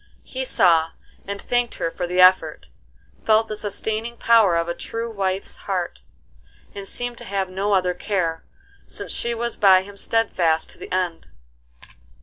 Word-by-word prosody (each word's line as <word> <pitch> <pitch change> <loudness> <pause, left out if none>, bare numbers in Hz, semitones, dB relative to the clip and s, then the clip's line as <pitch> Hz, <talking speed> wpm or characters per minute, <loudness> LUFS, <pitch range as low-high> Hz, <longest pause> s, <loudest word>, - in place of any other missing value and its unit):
He 260 0 -5
saw 165 -8 +3 0.3
and 200 0 -4
thanked 245 +1 -1
her 165 - -2
for 175 - -4
the 180 +1 -1
effort, 185 +1 +5 0.6
felt 220 0 +3
the 215 - -4
sustaining 220 +3 -3
power 225 -7 +4
of 170 0 0
a 170 - -1
true 230 +5 -5
wife's 195 -2 -2
heart, - - -2 0.7
and 200 -1 -7
seemed 245 +2 -4
to - - -8
have 195 -1 -2
no 200 +2 0
other 180 -2 +2
care, 175 -3 -2 0.4
since - - -7
she 235 0 0
was 235 +1 -3
by 190 -2 +6
him 200 +1 -12
steadfast 180 -8 0
to - - -18
the - - -9
end. 180 -2 -2
200 Hz, 160 wpm, -22 LUFS, 180-225 Hz, 0.7 s, by